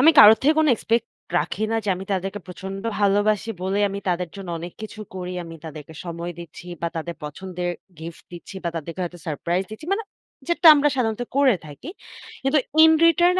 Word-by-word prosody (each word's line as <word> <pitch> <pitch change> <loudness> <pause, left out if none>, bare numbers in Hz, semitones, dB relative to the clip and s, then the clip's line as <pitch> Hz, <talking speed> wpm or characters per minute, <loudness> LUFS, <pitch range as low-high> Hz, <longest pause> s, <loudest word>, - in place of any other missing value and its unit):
আমি 315 +5 +8
কারো 215 +1 +11
থেকে 305 +3 +4
কোন 315 - +4
এক্সপেক্ট 230 +1 0 0.3
রাখি 220 - -2
না - - +2
যে, - - -3
আমি 190 - -6
তাদেরকে 195 +2 -2
প্রচন্ড 195 +2 -7 0.2
ভালোবাসি 205 +2 +2
বলে 190 +2 0
আমি 200 +1 -4
তাদের 180 -1 0
জন্য 195 -2 -8
অনেক 175 +1 -7
কিছু 215 0 -8
করি। 180 0 -5
আমি 165 0 -9
তাদেরকে 155 0 -9
সময় 170 0 -5
দিচ্ছি 170 +1 -10 0.2
বা, 170 - +1
তাদের 170 +1 -4
পছন্দের 180 +3 -4 0.3
গিফট 165 +1 -9
দিচ্ছি 175 +2 -10
বা, - - +1
তাদেরকে 165 +3 -5
হয়তো 175 0 -7
সারপ্রাইজ 170 +5 -1
দিচ্ছি। 305 +9 -9
মানে 445 +1 -4 0.4
যেটা 340 0 +3
আমরা 295 0 +4
সাধারণত 225 -1 0
করে 265 -7 +5
থাকি। 150 - -10 0.5
কিন্তু 270 +3 +3 0.3
in 320 - +8 0.2
return 345 +2 +5
190 Hz, 190 wpm, -23 LUFS, 170-225 Hz, 0.5 s, কারো